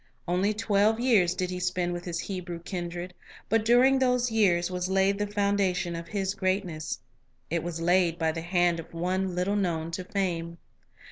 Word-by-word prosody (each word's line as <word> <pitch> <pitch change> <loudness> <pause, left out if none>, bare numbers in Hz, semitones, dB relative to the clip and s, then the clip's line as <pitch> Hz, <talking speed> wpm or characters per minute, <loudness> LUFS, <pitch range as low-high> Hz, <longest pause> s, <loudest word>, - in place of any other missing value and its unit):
Only 185 +4 +2
twelve 215 0 +2
years 215 -8 +3
did 185 0 -2
he 180 - -3
spend 180 -1 -1
with 175 0 -6
his 170 -1 -3
Hebrew 180 -3 -5
kindred; 175 0 -5 0.4
but 225 -1 +3
during 250 +4 +5
these 250 -2 +2
years 185 -5 +2
was 180 0 -2
laid 195 +1 +2
the 205 - 0
foundation 200 -3 0
of 170 0 -6
his 195 -1 -1
greatness; 185 -6 -2 0.5
it 170 -1 +1
was 170 0 -4
laid 175 0 +2
by 160 -1 +1
the 165 +1 -5
hand 175 0 +1
of 165 0 -10
one 185 +2 -1
little 185 +3 0
known 170 -5 -1
to 185 +2 -4
fame. 175 -4 -2
180 Hz, 180 wpm, -28 LUFS, 175-200 Hz, 0.5 s, during